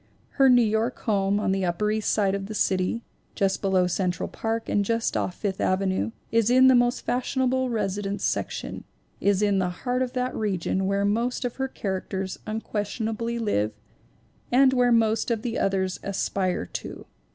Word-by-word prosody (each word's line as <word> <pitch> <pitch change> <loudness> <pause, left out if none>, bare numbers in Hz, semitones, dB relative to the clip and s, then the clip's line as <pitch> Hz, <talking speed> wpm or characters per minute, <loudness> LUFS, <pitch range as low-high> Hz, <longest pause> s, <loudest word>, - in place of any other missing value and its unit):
Her 270 -1 +4
New 245 -1 +6
York 220 +3 0
home 200 -2 +1
on 200 - 0
the 195 0 0
upper 180 +4 0
East 215 -1 0
Side 200 -3 +2
of 195 0 -3
the 215 - -6
city, 190 +4 0 0.3
just 195 -2 0
below 190 -2 +2
Central 180 0 -1
Park 225 0 -3
and 205 - +1
just 230 +2 0
off 180 - -1
Fifth 195 -3 -3
Avenue, 190 +1 +1 0.2
is 230 -1 +3
in 255 +1 +6
the - - +7
most 245 0 +3
fashionable 260 +1 0
residence 200 -3 -2
section, - - -2 0.4
is 200 0 +2
in 200 -2 +2
the 180 -1 +1
heart 245 +8 -2
of 255 -1 -1
that 255 0 -2
region 190 -2 -1
where 200 0 +1
most 235 +5 0
of 245 - -4
her 265 0 -1
characters 190 -4 -4
unques 215 -1 -2
tionably 230 +1 -2
live 110 - 0 0.8
and 260 +1 +5
where 245 -1 +3
most 225 -1 +2
of 230 -2 -1
the 240 -1 -2
others 190 -1 0
aspire 190 - -1
to. - - -7
210 Hz, 175 wpm, -25 LUFS, 195-240 Hz, 0.8 s, the